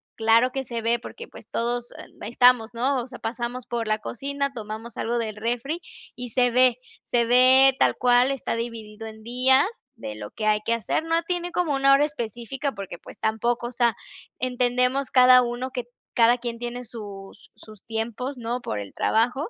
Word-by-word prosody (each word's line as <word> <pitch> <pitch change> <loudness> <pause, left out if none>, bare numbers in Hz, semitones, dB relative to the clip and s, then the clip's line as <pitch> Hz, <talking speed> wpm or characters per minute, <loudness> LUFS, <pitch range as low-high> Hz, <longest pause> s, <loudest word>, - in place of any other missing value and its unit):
claro 230 +3 +3
que 270 - -2
se 235 -2 -5
ve 230 +1 +1
porque, 465 - -10
pues, - - -14
todos, 240 +1 -2
em, - - -14
estamos, 245 0 +4
¿no? 255 +3 0
O 240 - -8
sea, 250 -1 -10
pasamos 240 +2 -4
por 235 -2 -3
la 215 0 +1
cocina, 280 +4 -3
tomamos 220 0 -7
algo 235 +1 -1
del 220 -3 -3
refri, 245 +9 -3 0.3
y 245 0 -6
se 245 +1 +2
ve 250 0 +4 0.3
se 235 -1 +1
ve 255 +2 +6
tal - - +3
cual, 245 +1 +4
está 270 -3 -2
dividido 225 -2 -6
en 220 0 -11
días 255 +4 +4 0.3
de 105 - -7
lo 105 -1 -8
que 215 - -5
hay 210 0 +3
que 230 - +2
hacer. 230 - -1
No 330 +1 +1
tiene 355 0 -3
como 340 -4 0
una 275 0 +4
hora 280 +2 +5
específica 270 0 -4
porque, 195 -4 -8
pues, - - -13
tampoco. 235 +2 0
O - - -7
sea, 235 -2 +2 0.4
entendemos 250 +1 +1
cada 255 -1 +7
uno 245 +2 -3
que 250 -2 -4 0.3
cada 235 +1 +5
quien 235 -1 -5
tiene 240 +1 -5
sus 205 -4 -10
sus 215 -3 -14
tiempos, 230 +4 -4
¿no?, 240 +1 -3
por 105 - -4
el 100 -1 -8
trabajo 245 - 0
240 Hz, 190 wpm, -24 LUFS, 225-255 Hz, 0.4 s, cada